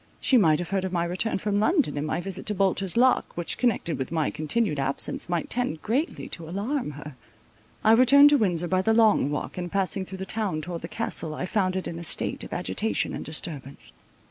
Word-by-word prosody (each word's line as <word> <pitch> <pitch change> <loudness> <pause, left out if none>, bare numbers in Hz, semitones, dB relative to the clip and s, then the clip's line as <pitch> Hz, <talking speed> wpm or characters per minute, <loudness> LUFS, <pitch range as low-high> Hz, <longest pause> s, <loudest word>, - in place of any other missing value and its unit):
She 265 - +2
might 165 -10 +5
have 175 +3 -5
heard 195 -1 0
of 190 - -3
my 170 -2 0
return 180 +6 -1
from 205 +1 -1
London, 300 - +2
and 145 +1 -2
my - - -1
visit 190 +1 -6
to 210 - 0
Bolter's 195 0 0
Lock, 255 -6 +3
which, 175 -1 -1
connected 220 - 0
with 130 - -4
my 160 -2 0
continued 155 +1 0
absence, 135 +4 -1
might 175 -2 -1
tend 240 -10 -2
greatly 275 - -1
to 165 -1 -5
alarm 220 - -2
her. 145 0 -9 0.7
I 220 - +5
returned 275 +5 +7
to 290 - +6
Windsor 175 -4 +1
by 185 +1 +1
the 225 +3 +2
Long 220 -10 +4
Walk, 150 +4 -4
and 175 -1 -5
passing 195 0 0
through 190 +1 -8
the 190 - -5
town 200 -5 -2
towards 170 0 -5
the 165 - -5
Castle, 165 -7 -3
I 180 - -3
found 185 -2 0
it 190 - -2
in 170 - -5
a - - -7
state 165 - -2
of - - -9
agitation 205 +5 -1
and - - -5
disturbance. 145 - -5
185 Hz, 220 wpm, -26 LUFS, 165-220 Hz, 0.7 s, returned